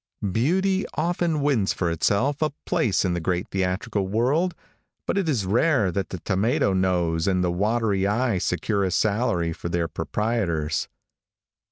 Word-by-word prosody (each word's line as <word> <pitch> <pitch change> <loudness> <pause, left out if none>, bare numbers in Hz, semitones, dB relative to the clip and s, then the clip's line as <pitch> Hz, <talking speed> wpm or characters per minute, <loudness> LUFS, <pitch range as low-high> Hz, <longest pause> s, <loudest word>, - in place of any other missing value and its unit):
Beauty 190 - +1
often 170 -1 0
wins 125 -9 +2
for 85 -3 -1
itself 120 - +1
a 155 - +2 0.2
place 110 -5 +1
in 90 - +1
the 85 - -1
great 90 +1 -2
theatrical 95 +1 -1
world, 135 - +1 0.5
but - - -1
it 195 -5 0
is 120 -10 0
rare 110 - +2
that 95 +2 -2
the 95 - -5
tomato 100 +1 +1
nose 90 -3 +1
and 90 -2 +2
the 90 - +1
watery 100 +1 +1
eye 110 -1 +1
secure 100 +3 0
a 95 - +1
salary 100 -4 +1
for 85 - -6
their 85 -1 0
proprietors. 85 -2 -1
100 Hz, 155 wpm, -24 LUFS, 90-125 Hz, 0.5 s, wins